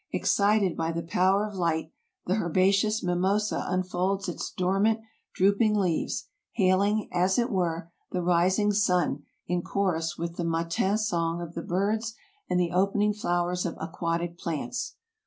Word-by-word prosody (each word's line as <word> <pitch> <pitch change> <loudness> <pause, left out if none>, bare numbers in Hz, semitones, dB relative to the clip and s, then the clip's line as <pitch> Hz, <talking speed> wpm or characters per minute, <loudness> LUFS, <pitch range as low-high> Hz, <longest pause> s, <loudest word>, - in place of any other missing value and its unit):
Excited 200 -3 +2
by 165 0 -1
the 165 0 -3
power 185 +5 +2
of 210 - -7
light, 165 -3 -1 0.3
the 185 +4 +1
herbaceous 195 +4 +2
mimosa 190 +4 0
unfolds 185 +1 -1
its 175 - -4
dormant, 195 +5 +1 0.4
drooping 200 +3 +3
leaves, 185 -6 0 0.3
hailing, 200 +2 +2
as 180 +2 +2
it 240 +1 +1
were, 170 -3 -1 0.2
the 180 -1 -2
rising 180 +4 +3
sun 180 -7 +2 0.2
in 180 0 -1
chorus 175 -3 -1
with 170 0 -4
the 175 - -1
matin 170 +4 0
song 170 -6 0
of 170 -1 -6
the 170 - -4
birds 215 +6 -1 0.3
and 180 - +2
the 175 -1 +1
opening 200 +3 +2
flowers 180 -4 -1
of 170 - -3
aquatic 170 +1 -3
plants. 175 - -3
185 Hz, 145 wpm, -27 LUFS, 170-200 Hz, 0.4 s, drooping